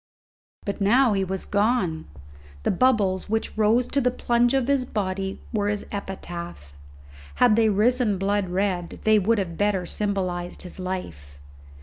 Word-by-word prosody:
But 200 0 -4
now 235 +4 +4
he 195 -1 +1
was 190 0 -4
gone! 200 -6 0 0.6
The - - +2
bubbles 200 -4 +2
which 220 +1 -1
rose 220 +3 +3
to 280 - +1
the 250 - +3
plunge 240 +1 +1
of 265 -2 +1
his 280 -2 +2
body 195 -4 -3
were 205 -2 0
his 205 0 -2
epitaph; 175 - -7 0.6
had 245 -4 +4
they 225 -1 +4
risen 215 +1 +2
blood 200 0 0
red 180 -2 -2
they 215 -1 +5
would 225 +4 +2
have 175 -5 -3
better 205 -3 +1
symbolized 185 -3 -2
his 180 +1 -9
life. 80 - -6
200 Hz, 150 wpm, -24 LUFS, 185-225 Hz, 0.6 s, they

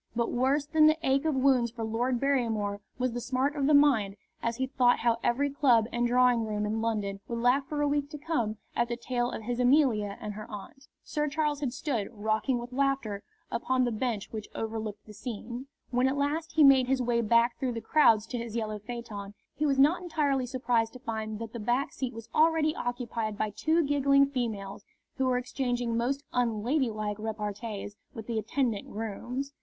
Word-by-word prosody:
But 235 0 0
worse 270 +4 +1
than 310 +1 +5
the 310 +1 +4
ache 270 +2 +2
of 310 -3 +1
wounds 260 -3 +3
for 230 0 -6
Lord 235 +3 0
Barrymore 225 -7 0 0.2
was 255 0 0
the 240 +1 -4
smart 260 +4 0
of 280 -2 +1
the 300 - +5
mind 240 -9 +4 0.3
as 230 0 -1
he 260 +2 -1
thought 250 -2 +2
how 235 -1 +2
every 280 +4 +1
club 255 -6 +4
and 240 0 +1
drawing 245 -1 +4
room 210 -1 -2
in 220 +1 -1
London 210 -3 -1
would 235 - -3
laugh 250 +4 +2
for 295 -1 -1
a - - +2
week 285 0 0
to 300 - -7
come 280 -9 -1 0.2
at 235 - +2
the 235 - -1
tale 240 0 -1
of 225 - -6
his 240 +2 -3
Amelia 245 -6 +3
and 210 - -5
her 215 +1 -8
aunt. 220 +7 -10 0.2
Sir 300 0 -1
Charles 300 0 0
had 275 -4 -1
stood, 240 -6 -2
rocking 220 +4 0
with 240 +1 -7
laughter, 270 -7 0 0.3
upon 255 +1 +1
the 240 - +1
bench 220 -2 -2
which 215 -2 -6
overlooked 220 -2 -4
the 215 - -12
scene. 240 +3 -6 0.2
When 250 +1 +3
at 270 +2 0
last 305 +3 -1
he 310 -1 +5
made 265 -2 +7
his 265 0 +2
way 240 -1 +1
back 235 +2 +3
through 255 -3 -1
the 230 - -3
crowds 225 -3 +4
to 245 - -3
his 230 -1 -6
yellow 215 -2 -2
phaeton, 210 -3 -7 0.2
he 300 - 0
was 275 -1 +2
not 295 +7 +4
entirely 285 -7 0
surprised 240 -3 0
to 255 - -10
find 220 -3 -4
that 225 0 -7
the 235 - -5
back 240 +6 0
seat 255 -3 -4
was 230 -1 -8
already 315 -1 +3
occupied 235 -3 -3
by 215 -1 -1
two 320 +10 +1
giggling 280 -1 +4
females, 220 -8 -4 0.3
who 265 - +1
were 250 -1 +2
exchanging 245 -2 -2
most 265 +5 0
unladylike 225 -2 0
repartees 210 -1 -5 0.2
with 225 -2 -7
the 230 -1 -1
attendant 225 -1 -1
grooms. 240 +6 -4
245 Hz, 205 wpm, -29 LUFS, 220-275 Hz, 0.3 s, made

